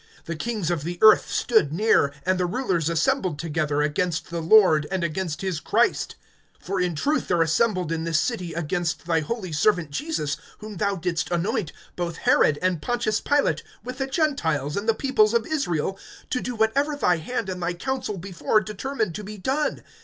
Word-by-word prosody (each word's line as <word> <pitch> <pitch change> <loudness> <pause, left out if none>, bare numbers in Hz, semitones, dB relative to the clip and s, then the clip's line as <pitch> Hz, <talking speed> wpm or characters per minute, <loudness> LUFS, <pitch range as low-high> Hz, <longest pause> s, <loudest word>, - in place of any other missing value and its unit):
(26)The 165 -1 -5
kings 215 -6 -2
of 165 -4 -2
the 175 +2 -4
earth 215 0 +7
stood 220 - +2
near, 175 -5 +3
And 185 0 +1
the 180 - +1
rulers 180 - 0
assembled 185 - +1
together, 150 -2 -1
Against 160 +3 -1
the 170 -1 -2
Lord, 160 -4 +5
and 190 -2 -1
against 170 -1 -3
his 190 -5 -2
Christ. - - +1 0.5
(27)For 190 0 0
in 175 -2 -1
truth 290 - 0
there 175 -2 +3
assembled 180 +1 +1
in 165 -1 -1
this 165 -1 +1
city, 185 -8 -2
against 170 +1 -2
thy 165 -1 +2
holy 185 +3 -4
servant 165 -1 +1
Jesus, 155 - -2 0.2
whom 215 -2 -9
thou 200 +1 0
didst 170 -2 -2
anoint, 175 -1 -1 0.2
both 170 -2 -3
Herod, 145 - +3
and 180 -4 +1
Pontius 235 -1 0
Pilate, 290 -1 +1 0.2
with 255 +2 -7
the 270 - -1
Gentiles, 165 - 0
and 205 +3 -2
the 225 - +4
peoples 235 -5 +2
of 230 -1 +2
Israel, 195 - -1 0.3
(28)to 255 - 0
do 245 - -3
whatever 275 +7 +1
thy 180 -11 +2
hand 225 +6 -3
and 180 -1 -4
thy 175 +1 -1
counsel 260 0 -3
before 190 +3 0
determined 215 0 -3
to 210 - -6
be 210 +1 -8
done. 270 +9 -1
185 Hz, 185 wpm, -24 LUFS, 165-225 Hz, 0.5 s, earth